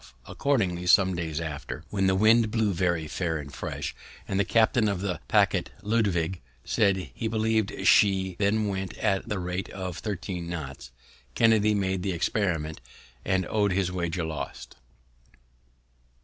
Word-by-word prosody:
Accordingly 95 Hz, -11 st, 0 dB
some 95 Hz, 0 st, +5 dB
days 80 Hz, -2 st, -3 dB
after, 75 Hz, -1 st, -5 dB
when 95 Hz, -2 st, +1 dB
the 95 Hz, -, +3 dB
wind 110 Hz, +3 st, +5 dB
blew 110 Hz, -2 st, +1 dB
very 85 Hz, -3 st, 0 dB
fair 80 Hz, -1 st, -2 dB
and 70 Hz, -2 st, -8 dB
fresh, -, -, -4 dB, 0.3 s
and 95 Hz, -, -1 dB
the -, -, +4 dB
captain 110 Hz, +1 st, +3 dB
of 100 Hz, -3 st, -1 dB
the 90 Hz, -4 st, -2 dB
paquet, -, -, +3 dB, 0.2 s
Lutwidge, 95 Hz, -6 st, 0 dB, 0.3 s
said 100 Hz, -4 st, +1 dB
he 115 Hz, -, -3 dB
believ'd 110 Hz, -1 st, 0 dB
she 95 Hz, -2 st, +4 dB
then 105 Hz, +1 st, +2 dB
went 95 Hz, -1 st, -4 dB
at 100 Hz, 0 st, 0 dB
the 105 Hz, -, -1 dB
rate 90 Hz, +1 st, -3 dB
of 90 Hz, -3 st, -5 dB
thirteen 95 Hz, -4 st, -4 dB
knots, 70 Hz, -7 st, -6 dB, 0.5 s
Kennedy 110 Hz, -2 st, +4 dB
made 95 Hz, -2 st, 0 dB
the 95 Hz, 0 st, -1 dB
experiment, 80 Hz, -4 st, -1 dB, 0.4 s
and 95 Hz, -1 st, +1 dB
own'd 100 Hz, 0 st, +1 dB
his 95 Hz, -1 st, 0 dB
wager 90 Hz, -1 st, -2 dB
lost. 80 Hz, -6 st, -6 dB
95 Hz, 150 wpm, -27 LUFS, 85-105 Hz, 0.5 s, some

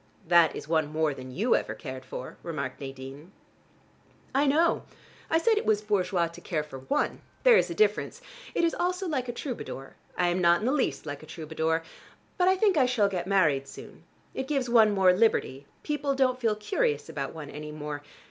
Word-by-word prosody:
"That 170 Hz, -1 st, +5 dB
is -, -, -7 dB
one 155 Hz, -2 st, +1 dB
more 155 Hz, -1 st, +1 dB
than 130 Hz, -1 st, -9 dB
you 200 Hz, -, +2 dB
ever -, -, -2 dB
cared 130 Hz, -3 st, -8 dB
for," 130 Hz, 0 st, -7 dB
remarked 140 Hz, -6 st, -5 dB
Nadine. 135 Hz, +4 st, -8 dB, 1.0 s
"I 280 Hz, +2 st, +3 dB
know. 320 Hz, +5 st, +3 dB, 0.5 s
I 325 Hz, -, +3 dB
said 440 Hz, +5 st, +3 dB
it -, -, -6 dB
was 215 Hz, -1 st, +2 dB
bourgeois 185 Hz, -4 st, +1 dB
to 170 Hz, +1 st, -9 dB
care 155 Hz, -3 st, -2 dB
for 140 Hz, -3 st, -9 dB
one. 130 Hz, -, -1 dB, 0.2 s
There -, -, +7 dB
is -, -, +3 dB
a -, -, -4 dB
difference. 430 Hz, +2 st, +1 dB, 0.4 s
It -, -, +2 dB
is 335 Hz, -, +3 dB
also 360 Hz, +2 st, -1 dB
like 260 Hz, -6 st, -2 dB
a -, -, +1 dB
troubadour. 240 Hz, -, -6 dB, 0.2 s
I 180 Hz, -1 st, +2 dB
am 175 Hz, +1 st, 0 dB
not 170 Hz, +1 st, +4 dB
in -, -, -2 dB
the 255 Hz, -, +2 dB
least 285 Hz, -, 0 dB
like 145 Hz, -2 st, -6 dB
a 155 Hz, -, -13 dB
troubadour. 160 Hz, +1 st, -2 dB, 0.6 s
But 360 Hz, -, +4 dB
I 375 Hz, -, +5 dB
think 380 Hz, -2 st, +3 dB
I 260 Hz, -3 st, +5 dB
shall 225 Hz, -5 st, +2 dB
get 180 Hz, -2 st, -3 dB
married 155 Hz, -9 st, +2 dB
soon. -, -, -12 dB, 0.3 s
It 265 Hz, -, -4 dB
gives 270 Hz, -5 st, -1 dB
one 225 Hz, -3 st, +6 dB
more 190 Hz, -2 st, +5 dB
liberty: 180 Hz, -, +1 dB, 0.2 s
people 290 Hz, -2 st, -1 dB
don't 255 Hz, -1 st, +2 dB
feel 225 Hz, -4 st, +1 dB
curious 205 Hz, -8 st, -1 dB
about 145 Hz, -3 st, -5 dB
one 150 Hz, -3 st, -8 dB
any 150 Hz, 0 st, -7 dB
more. 150 Hz, -1 st, -5 dB
180 Hz, 205 wpm, -28 LUFS, -, 1.0 s, There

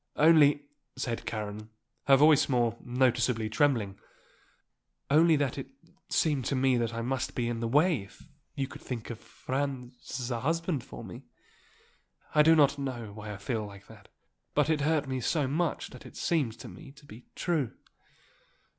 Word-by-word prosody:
"Only 150 Hz, -2 st, +5 dB, 0.2 s
" -, -, -53 dB
said 120 Hz, -2 st, -4 dB
Karen, 105 Hz, 0 st, -5 dB, 0.4 s
her 135 Hz, -, +8 dB
voice 150 Hz, +1 st, +5 dB
more 120 Hz, -3 st, +2 dB
noticeably 120 Hz, -3 st, +1 dB
trembling 110 Hz, -6 st, +1 dB, 1.1 s
"only 160 Hz, +2 st, +6 dB
that 140 Hz, -2 st, -1 dB
it 135 Hz, -, -6 dB, 0.4 s
seemed 145 Hz, -6 st, +1 dB
to -, -, 0 dB
me 130 Hz, 0 st, +3 dB
that 115 Hz, -2 st, 0 dB
I 115 Hz, 0 st, -4 dB
must 130 Hz, +1 st, -2 dB
be 120 Hz, -2 st, 0 dB
in 120 Hz, -1 st, -2 dB
the 115 Hz, -, -1 dB
way 150 Hz, -, +3 dB
if 100 Hz, -, -15 dB, 0.3 s
you 135 Hz, -3 st, -1 dB
could -, -, -11 dB
think 120 Hz, -2 st, -5 dB
of 115 Hz, -, -7 dB
Franz 130 Hz, -2 st, -5 dB
as 125 Hz, 0 st, -4 dB
a 120 Hz, -, -1 dB
husband 165 Hz, 0 st, -1 dB
for 120 Hz, -, -10 dB
me. 90 Hz, -5 st, -10 dB, 1.1 s
I 150 Hz, -, +6 dB
do 160 Hz, +2 st, +6 dB
not 145 Hz, -2 st, +4 dB
know 120 Hz, -6 st, -4 dB
why 105 Hz, 0 st, -7 dB
I 105 Hz, -, -6 dB
feel 110 Hz, 0 st, -3 dB
that. 100 Hz, +1 st, -14 dB, 0.5 s
But 150 Hz, +1 st, +3 dB
it 155 Hz, -2 st, +1 dB
hurt 150 Hz, -1 st, +1 dB
me 130 Hz, -1 st, -2 dB
so 145 Hz, +3 st, +1 dB
much 160 Hz, +5 st, -1 dB
that -, -, -11 dB
it -, -, -13 dB
seemed 145 Hz, -10 st, 0 dB
to -, -, -8 dB
me 105 Hz, +7 st, -11 dB
to 145 Hz, +1 st, -18 dB
be 115 Hz, -1 st, -13 dB
true." 155 Hz, -9 st, -1 dB
130 Hz, 175 wpm, -29 LUFS, 115-145 Hz, 1.1 s, her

